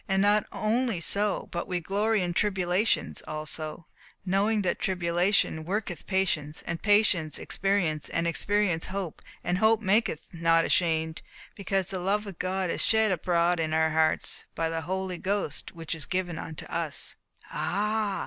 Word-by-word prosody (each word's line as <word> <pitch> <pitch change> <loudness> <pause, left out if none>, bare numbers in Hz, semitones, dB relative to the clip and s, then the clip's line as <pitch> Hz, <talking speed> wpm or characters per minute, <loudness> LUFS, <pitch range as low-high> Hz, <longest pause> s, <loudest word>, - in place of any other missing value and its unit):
And 195 0 +2
not 205 +1 +3
only 225 -2 0
so, 200 +4 +2
but 170 - -3
we 180 -1 -1
glory 205 +4 +1
in 175 -1 -2
tribulations 190 +1 +1
also; 155 +1 -3 0.4
knowing 200 +3 +2
that 180 - 0
tribulation 175 -1 +1
worketh 190 -1 -3
patience, 160 -6 0
and 170 -1 -3
patience 205 -7 +3
experience, 185 -6 0
and 165 - -1
experience 185 -1 +1
hope, 190 -4 -5 0.2
and 180 +1 0
hope 220 +1 +4
maketh 205 -5 +1
not 165 0 +3
ashamed, 160 -2 +1 0.3
because 195 -1 -1
the 190 0 -5
love 200 +4 0
of 195 -4 -9
God 185 -1 -1
is - - +2
shed 220 -2 +3
abroad 175 0 +1
in 155 -1 -1
our 160 0 +3
hearts, 160 0 +1
by 165 0 0
the 165 0 -2
Holy 185 +1 -3
Ghost 195 -5 -2
which 165 -2 -4
is 160 -4 -4
given 180 -3 -2
unto 160 -2 -7
us." - - -2 0.4
"Ah! 210 +1 0
185 Hz, 155 wpm, -28 LUFS, 165-205 Hz, 0.4 s, hope